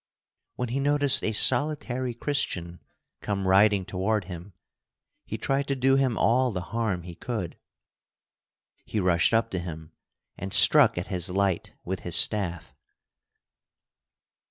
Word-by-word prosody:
When 125 Hz, -1 st, -4 dB
he 130 Hz, +4 st, -2 dB
noticed 145 Hz, 0 st, +1 dB
a 110 Hz, -, -1 dB
solitary 130 Hz, 0 st, +2 dB
Christian 90 Hz, -, -2 dB, 0.4 s
come 100 Hz, -2 st, -3 dB
riding 100 Hz, 0 st, +3 dB
toward 100 Hz, +2 st, -2 dB
him, 90 Hz, +2 st, -10 dB, 0.7 s
he -, -, -5 dB
tried 135 Hz, +1 st, -2 dB
to 140 Hz, -, -1 dB
do 135 Hz, +1 st, +2 dB
him 130 Hz, -4 st, 0 dB
all 125 Hz, +2 st, +2 dB
the 90 Hz, -3 st, -4 dB
harm 110 Hz, -7 st, -2 dB
he 85 Hz, 0 st, -10 dB
could. 95 Hz, -3 st, -6 dB, 1.3 s
He 110 Hz, -, -4 dB
rushed 90 Hz, -3 st, +2 dB
up 115 Hz, 0 st, 0 dB
to 95 Hz, -, -3 dB
him 80 Hz, -2 st, -9 dB, 0.5 s
and 95 Hz, +1 st, -6 dB
struck 115 Hz, +4 st, +6 dB
at 90 Hz, -, -3 dB
his 90 Hz, -1 st, 0 dB
light 95 Hz, -1 st, -2 dB
with 95 Hz, +1 st, -4 dB
his 90 Hz, -, -1 dB
staff. 90 Hz, -6 st, +1 dB
105 Hz, 135 wpm, -25 LUFS, 90-125 Hz, 1.3 s, struck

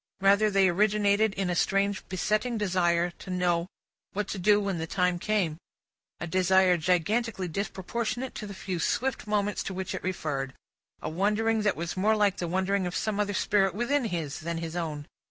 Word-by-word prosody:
Rather, 200 Hz, +2 st, +4 dB
they 195 Hz, -1 st, +4 dB
originated 205 Hz, +3 st, +3 dB
in 195 Hz, -1 st, -1 dB
a -, -, -1 dB
strange 195 Hz, +2 st, +1 dB
besetting 215 Hz, +6 st, 0 dB
desire 175 Hz, -4 st, +1 dB
to -, -, -10 dB
know 180 Hz, -1 st, +1 dB, 0.5 s
what 210 Hz, 0 st, -2 dB
to 195 Hz, -, -4 dB
do 205 Hz, +3 st, +4 dB
when 195 Hz, -4 st, -2 dB
the 160 Hz, -, -3 dB
time 180 Hz, 0 st, +1 dB
came; 185 Hz, -7 st, 0 dB, 0.6 s
a -, -, -3 dB
desire 185 Hz, +1 st, +4 dB
gigantically 185 Hz, +5 st, 0 dB
disproportionate 215 Hz, +7 st, -3 dB
to 210 Hz, -, -6 dB
the 200 Hz, -, -7 dB
few 190 Hz, -2 st, -4 dB
swift 255 Hz, +8 st, -1 dB
moments 210 Hz, -1 st, 0 dB
to 190 Hz, -, -5 dB
which 190 Hz, 0 st, -4 dB
it -, -, -4 dB
referred; 145 Hz, -7 st, -3 dB, 0.5 s
a -, -, -2 dB
wondering 210 Hz, +6 st, +1 dB
that 210 Hz, -1 st, +1 dB
was 170 Hz, +1 st, -4 dB
more 210 Hz, +4 st, +3 dB
like 205 Hz, -2 st, +2 dB
the 175 Hz, -, -2 dB
wondering 190 Hz, +2 st, 0 dB
of 175 Hz, -, -5 dB
some 215 Hz, -2 st, -1 dB
other 205 Hz, -1 st, 0 dB
spirit 195 Hz, -3 st, +2 dB
within 255 Hz, +4 st, +1 dB
his, 165 Hz, -8 st, -3 dB
than 170 Hz, +1 st, -3 dB
his 165 Hz, 0 st, -5 dB
own. 155 Hz, -4 st, -3 dB
190 Hz, 185 wpm, -28 LUFS, 175-210 Hz, 0.6 s, Rather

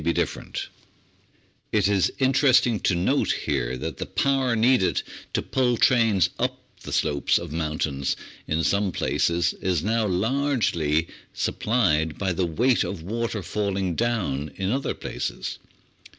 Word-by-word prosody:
Applied 85 Hz, +1 st, +1 dB
Science -, -, +2 dB
809 -, -, -7 dB, 1.0 s
It 105 Hz, -3 st, +3 dB
is 100 Hz, -3 st, +2 dB
interesting 130 Hz, -4 st, +4 dB
to 90 Hz, -, +1 dB
note 85 Hz, -, +1 dB
here -, -, -1 dB
that 80 Hz, +3 st, -5 dB
the -, -, -4 dB
power 135 Hz, -3 st, +1 dB
needed 110 Hz, -, +3 dB, 0.3 s
to -, -, 0 dB
pull 125 Hz, -2 st, +1 dB
trains 115 Hz, -, +3 dB
up -, -, -1 dB, 0.2 s
the -, -, -8 dB
slopes 70 Hz, -1 st, +2 dB
of 85 Hz, -3 st, -5 dB
mountains 75 Hz, -3 st, -1 dB, 0.3 s
in 80 Hz, +1 st, 0 dB
some 100 Hz, +1 st, +1 dB
places 85 Hz, 0 st, +1 dB
is 90 Hz, -4 st, 0 dB
now 110 Hz, +1 st, +1 dB
so -, -, -1 dB
largely 95 Hz, -, +1 dB, 0.3 s
supplied 80 Hz, -9 st, +1 dB
by 95 Hz, -2 st, 0 dB
the 90 Hz, +1 st, 0 dB
weight 120 Hz, +10 st, +2 dB
of 90 Hz, -5 st, -5 dB
water 110 Hz, +1 st, -3 dB
falling 95 Hz, -1 st, -1 dB
down 90 Hz, -, -1 dB
in 95 Hz, +1 st, -1 dB
other 135 Hz, +3 st, -1 dB
places. -, -, -4 dB
95 Hz, 145 wpm, -25 LUFS, 80-115 Hz, 1.0 s, interesting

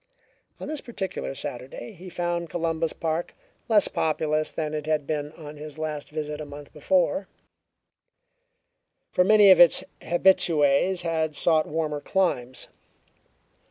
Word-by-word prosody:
On -, -, -6 dB
this 305 Hz, -1 st, -4 dB
particular 195 Hz, -, -5 dB
Saturday 130 Hz, -, -7 dB
he 185 Hz, -2 st, -11 dB
found 175 Hz, -1 st, -2 dB
Columbus 165 Hz, 0 st, -1 dB
Park 165 Hz, +1 st, -3 dB, 0.3 s
less 210 Hz, -3 st, +5 dB
populous 155 Hz, -1 st, -1 dB
than 155 Hz, -1 st, -3 dB
it 150 Hz, 0 st, -4 dB
had 155 Hz, -2 st, 0 dB
been 150 Hz, -1 st, -3 dB
on 150 Hz, -1 st, -10 dB
his 150 Hz, 0 st, -9 dB
last 155 Hz, -2 st, -4 dB
visit 150 Hz, 0 st, -5 dB
a -, -, -4 dB
month 145 Hz, 0 st, -11 dB
before, 185 Hz, +4 st, +1 dB, 1.8 s
for 180 Hz, -, +3 dB
many 210 Hz, 0 st, +7 dB
of 185 Hz, -, +7 dB
its 175 Hz, -2 st, +7 dB, 0.2 s
habitues 175 Hz, -1 st, +3 dB
had 160 Hz, -2 st, -1 dB
sought 160 Hz, 0 st, +3 dB
warmer 150 Hz, -1 st, -2 dB
climes. 130 Hz, -11 st, -1 dB
160 Hz, 130 wpm, -25 LUFS, 150-175 Hz, 1.8 s, many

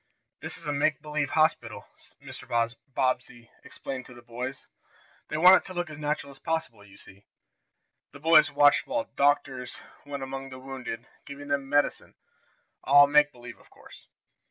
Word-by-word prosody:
"This -, -, -6 dB
is 165 Hz, -, -12 dB
a 145 Hz, -, -2 dB
make 145 Hz, +1 st, +1 dB
believe 150 Hz, -2 st, -2 dB
hospital," 155 Hz, +1 st, 0 dB, 0.3 s
Mr. -, -, -11 dB, 0.5 s
Bobbsey 125 Hz, -3 st, -2 dB
explained 130 Hz, -2 st, -7 dB
to 125 Hz, -, -14 dB
the 120 Hz, -, -14 dB
boys. 125 Hz, +3 st, -6 dB, 0.6 s
"They 155 Hz, -, -3 dB
want 180 Hz, +4 st, +8 dB
it -, -, -5 dB
to 185 Hz, -, -9 dB
look 175 Hz, -2 st, -3 dB
as 150 Hz, -, -9 dB
natural 150 Hz, -1 st, -3 dB
as 135 Hz, -, -17 dB
possible, 160 Hz, -10 st, -3 dB
you 100 Hz, -1 st, -17 dB
see." 100 Hz, +1 st, -17 dB, 0.9 s
The 140 Hz, -, -13 dB
boys 160 Hz, 0 st, +5 dB
watched 145 Hz, 0 st, +4 dB
while 290 Hz, +1 st, -1 dB
"doctors" 140 Hz, -3 st, 0 dB, 0.3 s
went 140 Hz, -1 st, -6 dB
among 135 Hz, 0 st, -6 dB
the 130 Hz, -, -9 dB
"wounded," 130 Hz, -3 st, -7 dB, 0.2 s
giving 145 Hz, +1 st, -9 dB
them 140 Hz, -1 st, -1 dB
"medicine," 145 Hz, +1 st, 0 dB, 0.7 s
all 145 Hz, +1 st, +7 dB
make 150 Hz, +1 st, +4 dB
believe, 120 Hz, -2 st, -12 dB
of -, -, -22 dB
course. -, -, -16 dB
140 Hz, 165 wpm, -27 LUFS, 130-150 Hz, 0.9 s, want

